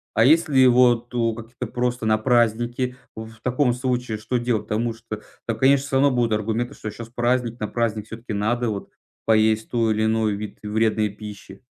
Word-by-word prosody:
А 115 - +5
если 145 -3 +5
вот 120 -1 +4
у 115 -2 +1
какие-то 120 +2 -7
просто 125 0 -2
на 110 0 +3
праздники, 120 +2 +1 0.2
в 110 0 -8
таком 125 0 +2
случае 125 -2 -2
что 115 +4 -2
делать? 120 -3 0
Потому 115 +2 -1
что 110 -1 -8 0.2
там, 115 -2 -2
конечно, 135 +2 +4
всё 140 - -3
равно 140 +1 +5
будут 120 -2 +1
аргументы, 115 +4 -1
что 110 - -6
щас 115 +2 -9
праздник. 120 0 0
На 105 - -2
праздник 110 -2 -1
всё-таки 115 +1 -7
надо 115 +4 0
вот 100 -2 -5 0.4
поесть 110 0 +3
той 115 -2 +1
или 110 +1 0
иной 110 -1 +1
вид 105 +1 -6
вредной 110 0 +1
пищи. 100 -1 -10
115 Hz, 185 wpm, -23 LUFS, 110-125 Hz, 0.4 s, А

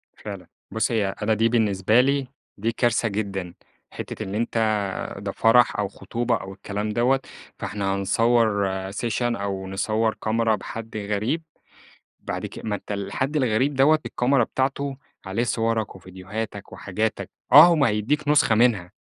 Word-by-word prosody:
فعلًا، 100 -4 -8 0.2
بُص 110 +2 0
هي 105 -4 0
أنا 110 +1 +2
دي 115 +2 +2
بالنسبة 110 -1 +3
لي 140 0 +1 0.3
دي 110 +3 0
كارثة 115 -1 +1
جدًا، 100 -4 -3 0.4
حتّة - - -6
اللي 95 +2 -4
أنت 115 +1 -2
آآ 105 -4 -1
ده 100 0 -4
فرح 115 +2 +4
أو 105 - +1
خطوبة 120 +4 -2
أو 95 -2 -6
الكلام 105 +2 -4
دوّة 120 +5 +2 0.4
فإحنا 100 -2 -2
نصور 105 +1 +2 0.2
session 105 +1 -2
أو 100 -5 -2
نصور 110 +3 0
كاميرا 110 0 +2
بحد 110 +2 -7
غريب 105 +10 -1 0.8
بعد - - -4
ك - - -10
ما 110 - -1
أنت 105 - -6
الحد 105 +9 -2
الغريب 130 +1 +1
دوّة 145 +4 +5
الكاميرا 125 0 +2
بتاعته 135 +2 -2 0.3
عليه 95 +5 -1
صورك 115 -3 -1
وفيديوهاتك 95 +3 -7
وحاجاتك، 110 +3 -3 0.2
آه - - +12
هو 175 -1 +4
ما 140 -4 +3
هيديك 125 +8 -1
نسخة 145 -6 +4
منها، 110 -6 +2
110 Hz, 150 wpm, -24 LUFS, 100-120 Hz, 0.8 s, آه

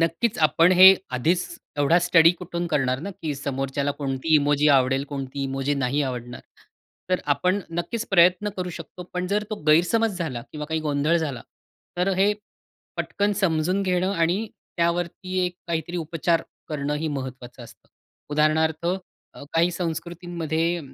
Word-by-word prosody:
नक्कीच 165 +7 0
आपण 165 +4 +5
हे 190 +1 +11 0.2
आधीच 170 +8 +1 0.3
एवढा 155 +4 +4
स्टडी 165 -2 +6
कुठून 175 -1 -4
करणार 130 -4 +1
ना 200 - -5
की 150 -3 -2
समोरच्याला 135 +1 -2
कोणती 140 +2 0
इमोजी 145 0 +3
आवडेल, 135 0 +3
कोणती 140 -1 -5
इमोजी 135 +1 -1
नाही 140 +2 0
आवडणार. 125 -2 -5 0.7
तर 185 - +2
आपण 185 +5 0 0.2
नक्कीच 230 +6 -3
प्रयत्न 180 +2 +4
करू 180 -1 -3
शकतो. 170 +1 -9
पण 180 0 -2
जर 205 +3 0
तो - - -1
गैरसमज 185 +6 +3
झाला 130 -9 -3
किंवा 150 -1 -5
काही 160 +1 -2
गोंधळ 150 +2 +1
झाला 145 -8 -3 0.5
तर 180 +2 +1
हे, 200 +2 +4 0.6
पटकन 205 +1 0
समजून 185 -1 +1
घेणं 185 0 +1
आणि 180 +5 +1 0.3
त्यावरती 175 +2 -1
एक 180 0 -7
काहीतरी 170 +1 -2
उपचार 165 0 0 0.3
करणंही 150 +1 -2
महत्त्वाचं 130 -2 -8
असतं. - - -17 0.4
उदाहरणार्थ 155 +2 +1 0.5
अ, - - -10
काही 170 +2 +3
संस्कृतींमध्ये 170 -1 -2
165 Hz, 145 wpm, -24 LUFS, 145-180 Hz, 0.7 s, हे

